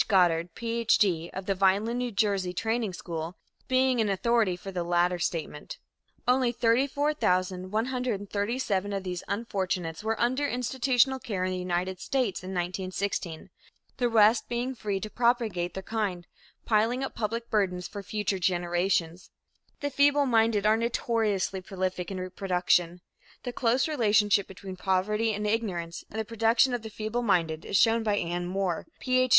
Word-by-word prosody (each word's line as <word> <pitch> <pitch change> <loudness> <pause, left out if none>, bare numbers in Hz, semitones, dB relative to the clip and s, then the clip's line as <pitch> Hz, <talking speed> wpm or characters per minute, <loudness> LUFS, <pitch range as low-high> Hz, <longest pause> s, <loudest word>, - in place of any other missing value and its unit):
Goddard, 175 -4 +3
Ph. 230 -1 +1
D., 170 -5 +1
of 190 0 -6
the 195 - +1
Vineland, 200 +6 +2
N. 245 -4 -3
J., 195 -3 +1
Training 225 +2 -1
School, 170 -1 -5 0.3
being 260 -2 +3
authority 215 -1 +2
for 195 +2 -8
the 180 -2 -2
latter 175 +1 +1
statement. 160 -4 -4 0.5
Only 250 -1 +3
34,137 220 -4 0
of 195 -1 -2
these 180 -2 -4
unfortunates 190 -5 -2
were 225 +1 -1
under 260 +4 +1
institutional 260 +1 +1
care 200 -7 -3
in 185 - -1
the 185 - -2
United 180 +1 -2
States 255 -7 -1
in 185 - -6
1916, 185 -1 -3 0.5
the 245 -2 +1
rest 220 0 +4
being 245 +2 -2
free 205 -5 -3
to 215 - -5
propagate 225 -7 0
their 190 - -5
kind 195 -5 -2 0.4
piling 230 +4 +2
up 270 - -4
public 230 +1 -3
burdens 180 -4 0
for 205 - -7
future 200 -1 -2
generations. 175 -1 0 0.5
The 285 0 -2
feebleminded 250 -7 +3
are 215 +1 +5
notoriously 225 -4 0
prolific 185 -1 -3
in 190 -2 -4
reproduction. 180 -1 0 0.4
The 245 - -4
close 245 +4 +2
relationship 210 -8 +3
between 190 0 -9
poverty 205 +4 +1
and 210 0 -3
ignorance 190 -6 -2
and 220 - -5
the 220 - -2
production 230 +3 +3
of 245 - -1
feebleminded 205 -8 0
is 195 - +1
shown 225 +2 +4
by 210 -2 +1
Anne 175 0 -2
Moore, 185 -2 -2
Ph. 255 0 +2
205 Hz, 145 wpm, -28 LUFS, 185-235 Hz, 0.5 s, are